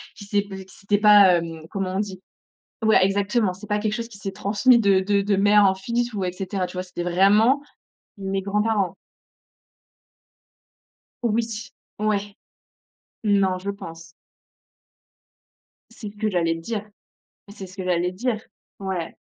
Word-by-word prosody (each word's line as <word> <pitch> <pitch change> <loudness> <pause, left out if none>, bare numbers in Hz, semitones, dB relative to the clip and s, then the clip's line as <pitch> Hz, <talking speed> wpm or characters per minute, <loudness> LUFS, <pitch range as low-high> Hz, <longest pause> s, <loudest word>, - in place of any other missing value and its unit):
qui 200 - -11
s'est 205 0 +1
posi 195 -1 -9
qui 185 - -18
s'était 205 0 0
pas, 205 -4 +7
hem, 165 -1 -5
comment 195 -2 -3
on - - 0
dit? 195 -3 -4 0.6
Voilà, 220 -3 +5
exactement, 200 +1 +1
c'est 190 +3 -11
pas 210 0 0
quelque 215 0 -1
chose 235 -1 -4
qui 215 -4 -14
s'est 195 - -4
transmis 210 +6 +3
de 200 -3 +4
de 200 +1 +1
de 200 0 +1
mère 205 +1 +5
en 190 - +4
fils 235 +5 -2
ou 200 -2 -2
et 180 - -1
cetera 185 0 -3
tu 180 - -11
vois? 185 0 -3
C'était 180 -1 -7
vraiment 200 +9 +4 0.6
mes 195 0 -2
grands-parents. 205 -2 0 2.3
Oui. 225 -1 -1 0.3
Ouais. 205 -1 -1 0.9
Non 200 -3 +2
je 195 +2 -5
pense. 165 -4 -9 1.9
C'est 225 -2 -8
ce 210 - -23
que 215 0 0
j'allais 170 -4 +1
dire 210 +5 -5 0.6
c'est 200 -2 -9
ce 185 - -14
que 190 - -5
j'allais 180 0 0
dire, 235 +4 -1 0.4
ouais. 190 -4 -4
200 Hz, 155 wpm, -23 LUFS, 185-210 Hz, 2.3 s, pas